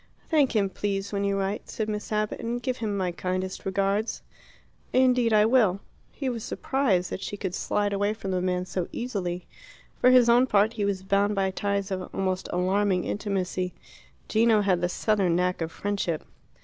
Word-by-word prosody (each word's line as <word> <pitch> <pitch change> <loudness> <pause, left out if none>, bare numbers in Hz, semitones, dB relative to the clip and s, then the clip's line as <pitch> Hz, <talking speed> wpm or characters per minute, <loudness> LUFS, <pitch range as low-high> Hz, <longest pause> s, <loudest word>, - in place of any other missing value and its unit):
"Thank 290 -6 +3
him, 200 -2 +3
please, 200 0 -3
when 200 0 0
you 200 0 +1
write," 195 +1 -3
said 220 - -3
Miss 210 0 -4
Abbott, 215 0 -1
"and 235 +1 -2
give 255 0 -2
him 210 -3 -2
my 185 -2 0
kindest 185 +2 -3
regards." 195 +3 0 0.7
"Indeed 250 -2 +4
I 210 -1 +5
will." 220 -6 +3 0.3
He 275 - -4
was 235 -3 -2
surprised 220 -10 0
that - - -4
she 205 - -5
could 190 -3 -4
slide 205 +2 0
away 205 +2 0
from 195 -3 -5
the 185 -1 0
man 180 0 0
so 185 -1 -3
easily. 185 -7 -3 0.5
For 250 - +6
his 250 -2 +6
own 240 +2 +5
part, 210 0 +3
he 210 -3 -1
was 195 -2 -1
bound 200 +2 +2
by 195 -1 +1
ties 200 0 -2
of 185 -1 -3
almost 185 -1 -1
alarming 185 +1 +1
intimacy. 185 -3 -2 0.5
Gino 220 -1 +4
had 185 -3 +2
the 175 - +1
southern 195 -3 +1
knack 180 0 0
of 165 0 -2
friendship. 200 -5 -2
200 Hz, 185 wpm, -26 LUFS, 185-220 Hz, 0.7 s, For